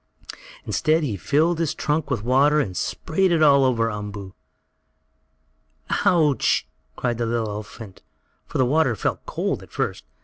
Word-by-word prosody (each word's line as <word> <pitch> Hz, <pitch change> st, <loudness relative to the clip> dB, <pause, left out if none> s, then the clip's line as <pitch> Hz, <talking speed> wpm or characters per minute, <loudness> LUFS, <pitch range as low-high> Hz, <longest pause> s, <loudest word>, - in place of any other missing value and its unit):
Instead 160 Hz, 0 st, +1 dB
he 120 Hz, -8 st, -2 dB
filled 155 Hz, -, +1 dB
his 160 Hz, -2 st, -1 dB
trunk 150 Hz, -1 st, -1 dB
with 120 Hz, -7 st, -2 dB
water 140 Hz, +5 st, +3 dB
and 95 Hz, -11 st, -2 dB
sprayed 185 Hz, -, 0 dB
it 165 Hz, -2 st, +3 dB
all 140 Hz, -2 st, +6 dB
over 115 Hz, -3 st, +1 dB
Umboo. 105 Hz, -2 st, -7 dB, 1.7 s
"Ouch!" 155 Hz, -6 st, +3 dB, 0.3 s
cried 120 Hz, -2 st, -2 dB
the 120 Hz, -, 0 dB
little 115 Hz, -1 st, -1 dB
elephant 105 Hz, -1 st, -8 dB
baby, -, -, -23 dB, 0.4 s
for -, -, -4 dB
the 130 Hz, -, +3 dB
water 135 Hz, -2 st, +2 dB
felt -, -, -2 dB
cold, -, -, -2 dB
at -, -, -14 dB
first. -, -, -3 dB
130 Hz, 150 wpm, -23 LUFS, 110-155 Hz, 1.7 s, all